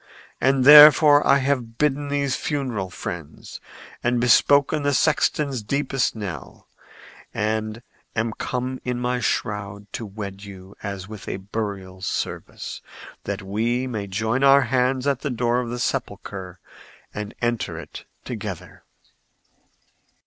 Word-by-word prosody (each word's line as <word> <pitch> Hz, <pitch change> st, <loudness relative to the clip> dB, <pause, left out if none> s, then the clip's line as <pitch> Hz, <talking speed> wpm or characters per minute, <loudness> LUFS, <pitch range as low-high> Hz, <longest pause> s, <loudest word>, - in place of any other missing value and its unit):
And 135 Hz, 0 st, +3 dB
therefore 150 Hz, 0 st, +9 dB
I 140 Hz, -, +6 dB
have 130 Hz, -4 st, -1 dB
bidden 145 Hz, -1 st, 0 dB
these 140 Hz, -2 st, 0 dB
funeral 125 Hz, -10 st, -3 dB
friends, 85 Hz, -4 st, -8 dB, 0.4 s
and 120 Hz, 0 st, +1 dB
bespoken 140 Hz, +5 st, +4 dB
the 145 Hz, -1 st, +1 dB
sexton's 145 Hz, -4 st, +1 dB
deepest 135 Hz, +3 st, -1 dB
knell, 100 Hz, -5 st, -7 dB, 0.7 s
and 110 Hz, +1 st, -2 dB, 0.3 s
am 115 Hz, 0 st, -1 dB
come 130 Hz, +2 st, -4 dB
in 125 Hz, -1 st, -2 dB
my 125 Hz, 0 st, -1 dB
shroud 105 Hz, -3 st, -2 dB
to 115 Hz, -, -5 dB
wed 100 Hz, -1 st, -7 dB
you 95 Hz, -1 st, -11 dB
as 100 Hz, -2 st, -6 dB
with 105 Hz, -2 st, -10 dB
a -, -, -3 dB
burial 95 Hz, -2 st, -5 dB
service, 90 Hz, -, -4 dB, 0.4 s
that 100 Hz, 0 st, -4 dB
we 115 Hz, +6 st, -1 dB
may 110 Hz, -6 st, -4 dB
join 110 Hz, +7 st, -1 dB
our 140 Hz, 0 st, +7 dB
hands 130 Hz, +1 st, 0 dB
at 140 Hz, -3 st, +1 dB
the 145 Hz, -, -2 dB
door 120 Hz, 0 st, 0 dB
of 125 Hz, -2 st, -3 dB
the 120 Hz, -, -4 dB
sepulchre 95 Hz, -6 st, -4 dB, 0.5 s
and 105 Hz, 0 st, -6 dB
enter 120 Hz, -8 st, -2 dB
it 80 Hz, -, -10 dB, 0.2 s
together." -, -, -7 dB
120 Hz, 130 wpm, -23 LUFS, 100-135 Hz, 0.7 s, therefore